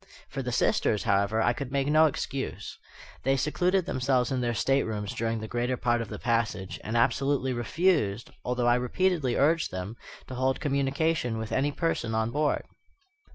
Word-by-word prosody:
For -, -, -4 dB
the -, -, -3 dB
sisters, 105 Hz, -, +1 dB
however, 100 Hz, +1 st, +2 dB
I 120 Hz, -, +3 dB
could 135 Hz, 0 st, -6 dB
make 140 Hz, -1 st, +1 dB
no 155 Hz, +2 st, +5 dB
excuse. 135 Hz, -2 st, -4 dB, 0.5 s
They 135 Hz, +1 st, +2 dB
secluded 180 Hz, +6 st, +1 dB
themselves 130 Hz, -1 st, +1 dB
in 130 Hz, -1 st, 0 dB
their 120 Hz, -1 st, -1 dB
staterooms 110 Hz, -5 st, 0 dB
during 115 Hz, 0 st, -1 dB
the 110 Hz, -, -5 dB
greater 120 Hz, +2 st, -1 dB
part 120 Hz, -1 st, +1 dB
of 115 Hz, -, -5 dB
the -, -, -5 dB
passage, 115 Hz, -5 st, -1 dB
and 110 Hz, +2 st, -1 dB
absolutely 130 Hz, +2 st, +1 dB
refused, 120 Hz, -, 0 dB
although 125 Hz, 0 st, -1 dB
I 120 Hz, 0 st, +4 dB
repeatedly 150 Hz, -1 st, +1 dB
urged 160 Hz, +4 st, +2 dB
them, 95 Hz, +5 st, -6 dB, 0.3 s
to -, -, -9 dB
hold 130 Hz, +1 st, 0 dB
communication 140 Hz, -2 st, 0 dB
with 110 Hz, -1 st, -5 dB
any 140 Hz, +2 st, +1 dB
person 140 Hz, -8 st, -1 dB
on 110 Hz, +1 st, 0 dB
board. 150 Hz, +2 st, 0 dB
125 Hz, 170 wpm, -28 LUFS, 115-140 Hz, 0.5 s, no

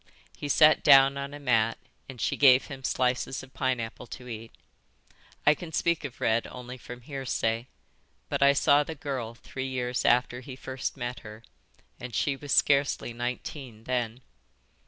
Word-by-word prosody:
He 145 Hz, -, -6 dB
sat 155 Hz, +2 st, +6 dB
down 135 Hz, -1 st, +7 dB
on 140 Hz, 0 st, -5 dB
a 145 Hz, -, -8 dB
mat 115 Hz, -5 st, +2 dB, 0.3 s
and 130 Hz, -2 st, -9 dB
she -, -, 0 dB
gave 130 Hz, -2 st, +6 dB
him 135 Hz, -2 st, -9 dB
slices 125 Hz, +1 st, 0 dB
of 135 Hz, -, -15 dB
pineapple 125 Hz, -2 st, -2 dB
to 125 Hz, +1 st, -9 dB
eat. 115 Hz, -1 st, -7 dB, 0.9 s
I 150 Hz, -, +7 dB
can 165 Hz, +1 st, -9 dB
speak 170 Hz, +1 st, 0 dB
of 140 Hz, -4 st, -7 dB
Red 110 Hz, +1 st, +1 dB
only 125 Hz, 0 st, -8 dB
from 125 Hz, -1 st, -10 dB
hearsay, 120 Hz, -3 st, -2 dB, 0.6 s
but -, -, -2 dB
I 140 Hz, 0 st, +6 dB
saw 145 Hz, +1 st, +4 dB
the 160 Hz, +2 st, -7 dB
girl 130 Hz, -6 st, -4 dB
three 130 Hz, +2 st, -6 dB
years 125 Hz, -1 st, -2 dB
after 125 Hz, 0 st, +2 dB
he 130 Hz, 0 st, -9 dB
first 130 Hz, +1 st, -5 dB
met 120 Hz, -1 st, -4 dB
her, 105 Hz, +1 st, -11 dB, 0.6 s
and 125 Hz, -3 st, -7 dB
she 140 Hz, +5 st, +1 dB
was 145 Hz, +1 st, -8 dB
scarcely 140 Hz, -4 st, +2 dB
nineteen 120 Hz, -1 st, -5 dB
then. 120 Hz, -1 st, -2 dB
130 Hz, 165 wpm, -28 LUFS, 120-140 Hz, 0.9 s, down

